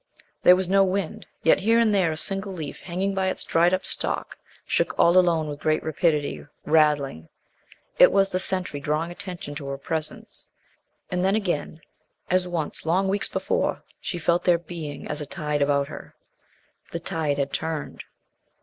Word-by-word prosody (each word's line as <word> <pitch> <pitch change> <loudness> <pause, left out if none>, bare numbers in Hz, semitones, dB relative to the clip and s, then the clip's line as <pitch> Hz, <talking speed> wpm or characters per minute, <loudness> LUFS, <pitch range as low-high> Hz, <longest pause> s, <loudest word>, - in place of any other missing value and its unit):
There 180 - +8
was 185 0 -1
no 195 +1 +5
wind, 190 -2 -2 0.2
yet 160 - +5
here 225 +4 +3
and 230 -2 +4
there 185 -5 +3
a 155 - -4
single 195 +4 +1
leaf 155 -5 -6
hanging 190 +3 -2
by 190 -1 0
its 185 - -2
dried 170 +2 +3
up 185 0 0
stalk - - -2 0.3
shook - - 0
all 170 - +5
alone 170 -4 +4
with 145 -1 -6
great 155 0 +1
rapidity 155 -2 0 0.2
rattling. 150 - +2 0.7
It - - +8
was 195 0 +3
the 185 - -1
sentry 185 -6 0
drawing 150 +4 -1
attention 175 -4 -7
to 140 -3 -7
her 140 0 -3
presence. 155 +1 -4 0.6
And 180 0 0
then, 195 +2 +3
again, 175 -6 -2 0.5
as 185 0 +3
once 165 -4 -3
long 185 +4 +1
weeks 200 +1 0
before, - - -1 0.2
she 175 - -4
felt 170 +1 +1
their 175 -2 +4
Being 165 -4 -7
as 150 - -2
a 145 - -5
tide 150 0 -2
about 140 0 +2
her. - - -10 0.8
The 170 - -3
tide 155 -3 -1
had 140 -1 -2
turned. 160 -2 -3
170 Hz, 175 wpm, -25 LUFS, 150-185 Hz, 0.8 s, There